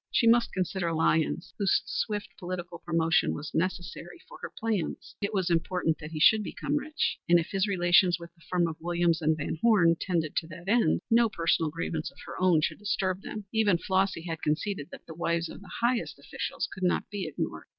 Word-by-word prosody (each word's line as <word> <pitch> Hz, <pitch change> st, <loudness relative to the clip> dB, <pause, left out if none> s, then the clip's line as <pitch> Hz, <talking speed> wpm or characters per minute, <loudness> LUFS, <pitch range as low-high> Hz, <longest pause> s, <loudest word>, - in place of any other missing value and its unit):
She 235 Hz, -, +2 dB
must 230 Hz, +1 st, +5 dB
consider 185 Hz, -2 st, -1 dB
Lyons, 160 Hz, +1 st, +1 dB
whose 200 Hz, -2 st, +3 dB
swift 210 Hz, -2 st, -2 dB
political 175 Hz, -1 st, -5 dB
promotion 165 Hz, 0 st, +1 dB
was 150 Hz, 0 st, -7 dB
necessary 175 Hz, 0 st, -3 dB
for -, -, -12 dB
her -, -, -5 dB
plans. 220 Hz, -6 st, -3 dB
It 200 Hz, +1 st, -1 dB
was 190 Hz, -4 st, 0 dB
important 165 Hz, -1 st, +1 dB
that 150 Hz, -, -7 dB
he 160 Hz, -1 st, -5 dB
should 215 Hz, +7 st, +6 dB
become 285 Hz, -, -3 dB
rich, 310 Hz, +1 st, -2 dB
and 175 Hz, -, +7 dB
if 170 Hz, -, -1 dB
his 195 Hz, +1 st, +1 dB
relations 180 Hz, -1 st, +4 dB
with 170 Hz, 0 st, -11 dB
the 170 Hz, -, -27 dB
firm 175 Hz, -2 st, +2 dB
of 160 Hz, -1 st, -6 dB
Williams 170 Hz, -1 st, +1 dB
& 155 Hz, 0 st, +3 dB
Van 155 Hz, +1 st, -3 dB
Horne 190 Hz, -8 st, +5 dB
tended 165 Hz, -5 st, -1 dB
to 160 Hz, -, 0 dB
that 170 Hz, +3 st, -11 dB
end, 230 Hz, +3 st, +3 dB
no 230 Hz, 0 st, +5 dB
personal 165 Hz, -4 st, +1 dB
grievance 160 Hz, 0 st, -3 dB
of -, -, -23 dB
her -, -, -7 dB
own 180 Hz, -4 st, +4 dB
should -, -, -1 dB
disturb 195 Hz, -2 st, -1 dB
them. 210 Hz, 0 st, -7 dB
Even 215 Hz, -5 st, +3 dB
Flossy 190 Hz, -1 st, 0 dB
had 165 Hz, -2 st, -5 dB
conceded 155 Hz, +1 st, -1 dB
that -, -, -11 dB
the 160 Hz, -, -9 dB
wives 170 Hz, 0 st, -1 dB
of -, -, -10 dB
the 200 Hz, -, -13 dB
highest 240 Hz, 0 st, 0 dB
officials -, -, -4 dB
could 190 Hz, -, -10 dB
not 180 Hz, -1 st, +1 dB
be 200 Hz, -4 st, -3 dB
ignored. 155 Hz, -, -4 dB
175 Hz, 205 wpm, -28 LUFS, 165-200 Hz, -, and